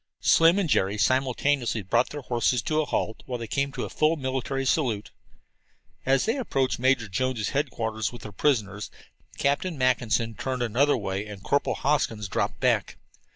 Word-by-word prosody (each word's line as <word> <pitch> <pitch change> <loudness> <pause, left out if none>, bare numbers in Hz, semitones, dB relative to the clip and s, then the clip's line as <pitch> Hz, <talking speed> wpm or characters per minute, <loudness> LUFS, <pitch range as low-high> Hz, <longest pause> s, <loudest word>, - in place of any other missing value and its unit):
Slim 165 +3 +5
and 200 -4 +1
Jerry 100 -7 +1
simultaneously 130 -1 +1
brought 115 +7 +2
their 145 -1 -7
horses 120 0 +1
to 155 -1 +1
a - - -2
halt 110 - -2
while 125 -2 -3
they 115 - -5
came 140 +5 -1
to - - -3
a - - -7
full 155 +1 +2
military 135 -1 -2
salute. 120 -8 0 1.0
As 135 0 +3
they 225 +5 0
approached 135 - 0
Major 130 -3 +2
Jones' 120 +1 -1
headquarters 115 -6 -2
with 120 - -11
their 105 - -7
prisoners, 105 -3 0 0.5
Captain 145 +4 0
Mackinson 120 -3 +1
turned 130 +2 -3
another 130 +6 +2
way 100 -1 -3
and 100 -2 -9
Corporal 140 - +1
Hoskins 125 -8 0
dropped - - -2
back. - - +1
130 Hz, 165 wpm, -26 LUFS, 110-140 Hz, 1.0 s, Slim